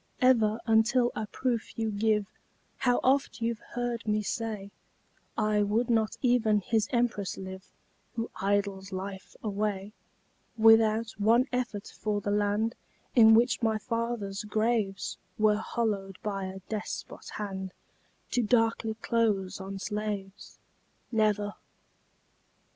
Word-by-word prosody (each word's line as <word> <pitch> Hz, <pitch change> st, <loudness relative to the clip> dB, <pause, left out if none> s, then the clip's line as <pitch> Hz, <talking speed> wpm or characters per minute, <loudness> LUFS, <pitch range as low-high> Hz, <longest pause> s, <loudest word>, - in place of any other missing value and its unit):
Ever, 230 Hz, -4 st, +4 dB
until 240 Hz, +2 st, +3 dB
a 215 Hz, -, -3 dB
proof 240 Hz, -1 st, -2 dB
you 225 Hz, -1 st, 0 dB
give 210 Hz, 0 st, +1 dB, 0.5 s
How 245 Hz, -2 st, +2 dB
oft 270 Hz, +2 st, +2 dB
you've 230 Hz, -1 st, -1 dB, 0.2 s
heard 240 Hz, -2 st, -2 dB
me 210 Hz, 0 st, +1 dB
say, 210 Hz, -1 st, -3 dB, 0.7 s
I 215 Hz, -1 st, +2 dB
would 220 Hz, +4 st, +1 dB
not 220 Hz, -2 st, +1 dB
even 235 Hz, -4 st, +3 dB
his 225 Hz, +1 st, +1 dB
empress 235 Hz, -5 st, 0 dB
live 190 Hz, 0 st, -7 dB, 0.5 s
Who 230 Hz, 0 st, -3 dB
idles 200 Hz, -1 st, 0 dB
life 190 Hz, 0 st, -6 dB
away, 205 Hz, -1 st, -2 dB, 0.6 s
Without 225 Hz, 0 st, +5 dB
one 230 Hz, +5 st, +4 dB
effort 245 Hz, -5 st, -2 dB
for 210 Hz, -1 st, -1 dB
the 205 Hz, 0 st, -2 dB
land 205 Hz, +2 st, +1 dB, 0.4 s
In 225 Hz, -2 st, +8 dB
which 240 Hz, +3 st, +3 dB
my 220 Hz, -2 st, +2 dB
fathers' 230 Hz, -3 st, -3 dB
graves 215 Hz, -2 st, -1 dB, 0.2 s
Were 215 Hz, -1 st, +4 dB
hollowed 210 Hz, -4 st, -2 dB
by 195 Hz, -2 st, -2 dB
a 190 Hz, 0 st, -7 dB
despot 215 Hz, -1 st, -5 dB
hand 190 Hz, -2 st, -4 dB, 0.6 s
To 245 Hz, -, +2 dB
darkly 225 Hz, -1 st, +2 dB
close 215 Hz, -4 st, 0 dB
on 195 Hz, +1 st, -6 dB
slaves 205 Hz, -1 st, -5 dB, 0.5 s
Never! 210 Hz, -2 st, +1 dB
215 Hz, 120 wpm, -29 LUFS, 205-230 Hz, 0.7 s, In